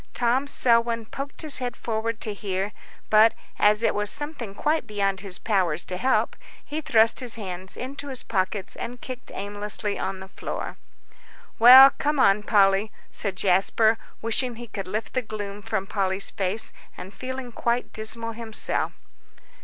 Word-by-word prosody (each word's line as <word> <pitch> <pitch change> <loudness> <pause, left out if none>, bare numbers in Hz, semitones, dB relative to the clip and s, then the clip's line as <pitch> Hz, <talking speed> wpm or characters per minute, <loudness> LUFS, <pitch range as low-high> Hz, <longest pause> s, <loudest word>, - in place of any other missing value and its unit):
Tom 250 +3 +2
Selwyn 230 -3 +2
poked 275 +7 -6
his 300 -4 0
head 245 -1 -4
forward 225 0 -2
to 215 - -2
hear, 195 -1 -3 0.4
but, 220 +1 +6 0.2
as 210 +2 +4
it - - +3
was 210 0 -1
something 290 -9 -4
quite 305 0 0
beyond 200 -2 0
his 190 -2 -6
powers 180 -7 0
to 180 - -4
help, 255 +8 +1 0.3
he 305 +2 -4
thrust 230 -7 +3
his 245 -4 -3
hands 190 -3 -6
into 275 +3 -6
his 260 -2 -4
pockets, 190 -1 -2
and 245 +1 -6
kicked 255 0 -7
aimlessly 205 +1 -3
on 190 0 -3
the 190 - -9
floor. - - -6 0.8
"Well, 260 +4 +11
come 295 0 0
on, 195 -4 +5
Polly," 205 0 +3 0.2
said 200 -3 -3
Jasper, 200 +4 +3 0.2
wishing 235 +2 0
he 240 +1 -8
could 205 -4 -6
lift 215 +4 -4
the 255 - +1
gloom 210 -3 -6
from 195 -1 -2
Polly's 195 -1 -1
face, 200 +3 -2 0.2
and 190 +2 -9
feeling 260 -1 -6
quite 235 +1 -1
dismal 230 +1 -3
himself. 225 -1 -2
220 Hz, 160 wpm, -25 LUFS, 195-245 Hz, 0.8 s, Well